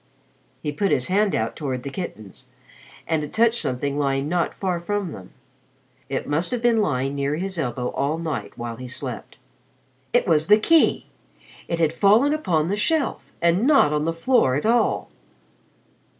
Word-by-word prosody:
He 150 - -1
put 195 +7 0
his 125 -2 +1
hand 200 +2 +2
out 110 +1 -2
toward 130 -5 -4
the 140 - -5
kittens, 125 - -8 0.6
and 160 -2 0
it 150 - -7
touched 230 +1 +2
something 140 +3 -2
lying 135 0 0
not 170 +1 -1
far 185 -3 -2
from 200 0 -3
them. 95 -8 -10 0.8
It 135 - -3
must 155 +4 0
have 245 - -2
been 235 -2 +3
lying 135 -6 -1
near 140 +1 -1
his 185 +1 -3
elbow 125 -3 -2
all 145 +3 -1
night 165 -3 -5
while 120 -1 -5
he 130 +1 -8
slept. 125 - -7 0.7
It - - +2
was 155 -1 +2
the 210 +1 +7
key! 320 +9 +3 0.6
It 170 - -2
had 160 -1 +1
fallen 215 - +4
upon 175 - 0
the 195 - 0
shelf, 300 +7 -1
and 175 +8 +3
not 275 - +5
on 150 0 0
the 165 - +1
floor 165 - +2
at 145 - -2
all. 235 +1 +1
160 Hz, 175 wpm, -23 LUFS, 140-205 Hz, 0.8 s, the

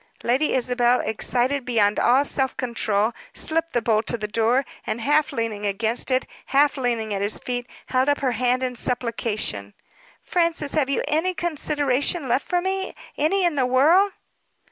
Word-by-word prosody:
Lady 260 +6 +1
Isabel, 245 -1 +2
excited 250 +5 0
beyond 215 -4 +1
all 265 +4 +4
self 270 -2 -1
control, 225 -3 0 0.2
slipped 330 +1 0
the 240 - 0
bolt 220 -1 +1
of 235 - -3
the 210 - -3
door; 230 +5 +1 0.2
and, 225 - -2
half 295 +6 +2
leaning 225 -3 -3
against 220 +5 -1
it, 255 0 +1 0.2
half 285 +2 +3
leaning 235 -5 -1
at 195 - -2
his 205 +1 +1
feet, 245 0 -4 0.2
held 260 +2 +1
up 285 - +1
her 260 -2 +1
hand 250 +2 0
in 250 -1 -2
supplication. 225 - -2 0.5
"Francis, 335 -4 0
have 285 -4 +1
you 275 - 0
any 325 +5 0
consideration 290 -2 0
left 255 +3 0
for 355 -1 +1
me 380 +1 -3 0.2
any 360 +5 +1
in 345 - +2
the 265 -3 +1
world?" 325 +11 +4
255 Hz, 165 wpm, -23 LUFS, 230-295 Hz, 0.5 s, all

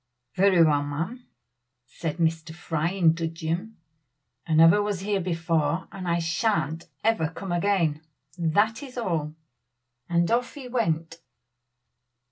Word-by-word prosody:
"Very 185 -3 +5
well, 150 -2 +3
ma'am!" 165 - -5 0.6
said 155 +4 -5
Mr. 160 -1 -1
Fry, 165 -2 -1
in 175 -4 +3
dudgeon. 165 +5 -4 0.7
"I 160 - +1
never 165 +6 +7
was 205 -3 -2
here 200 0 0
before, 165 -2 0
and 190 -2 -7
I 170 0 +2
shan't 165 -1 -1 0.2
ever 220 -8 +2
come 180 +3 -7
again 175 -4 +1 0.3
that 205 +7 +1
is 260 -3 -10
all 160 -9 -2 0.4
" 120 +2 -51
and 170 +1 +2
off 245 +4 0
he 275 -3 -8
went. 165 -9 -1
170 Hz, 130 wpm, -26 LUFS, 160-200 Hz, 0.7 s, never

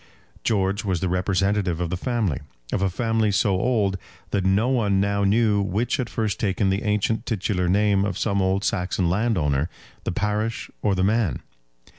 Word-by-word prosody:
George 100 -2 +1
was 95 -4 0
the 95 - -1
representative 95 0 0
of 85 -1 -2
the - - 0
family, 110 - -1 0.3
of - - 0
a 95 - +2
family 115 +2 0
so 100 +1 +2
old 100 -1 +1 0.3
that 100 - 0
no 95 +5 +2
one 105 -7 +2
now 100 0 +1
knew 105 0 +3
which 100 +7 0
had 125 -4 -2
first 110 -3 -2
taken 95 -1 +1
the 95 +2 0
ancient 105 +1 0
titular 95 -4 0
name 100 +1 +3
of 100 -1 -2
some 100 -2 0
old 95 +1 +1
Saxon 90 -2 0
landowner, 85 -8 +1 0.3
the - - -2
parish, 105 +4 -2
or 100 - +1
the 95 - +1
man. 105 - +1
100 Hz, 175 wpm, -24 LUFS, 95-110 Hz, 0.3 s, knew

